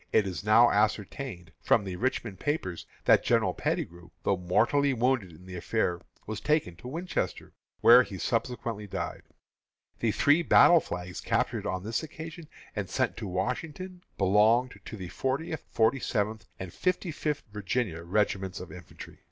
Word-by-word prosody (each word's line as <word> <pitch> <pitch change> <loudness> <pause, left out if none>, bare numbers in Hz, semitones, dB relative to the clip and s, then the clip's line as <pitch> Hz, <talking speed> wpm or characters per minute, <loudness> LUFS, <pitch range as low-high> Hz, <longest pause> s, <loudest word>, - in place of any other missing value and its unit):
It 105 - +4
is 95 -1 -4
now 110 +3 +6
ascertained, 105 -2 -1
from - - +3
the 95 -2 -5
Richmond 115 -2 -2
papers, 120 - -2 0.2
that - - +5
General - - +2
Pettigrew, 85 0 -3
though 100 - +2
mortally 115 +11 +2
wounded 120 -6 +1
in 85 +3 -15
the 95 -1 -8
affair, 90 0 -1 0.2
was 110 0 -5
taken 150 - +1
to 90 - -10
Winchester, 170 +7 -3 0.3
where 120 +2 +9
he 100 -6 -5
subsequently 115 -1 -2
died. - - -4 0.8
The - - +1
three 145 +4 +4
battle 170 0 +7
flags 90 - -6
captured - - 0
on 95 0 -2
this 110 +2 -1
occasion, 160 +1 -9 0.3
and - - -3
sent - - 0
to 110 - -5
Washington, 150 - -4 0.2
belonged 105 +4 +3
to 110 - -7
the 90 -3 -7
Fortieth, 140 - -2
Forty 115 +4 +2
seventh, 110 -1 -2
and 90 -2 -7
Fifty 185 -1 -1
fifth 150 -1 -2
Virginia 105 -3 -2
regiments 95 +1 -1
of 90 - -9
infantry. 90 -1 -11
110 Hz, 155 wpm, -29 LUFS, 95-135 Hz, 0.8 s, where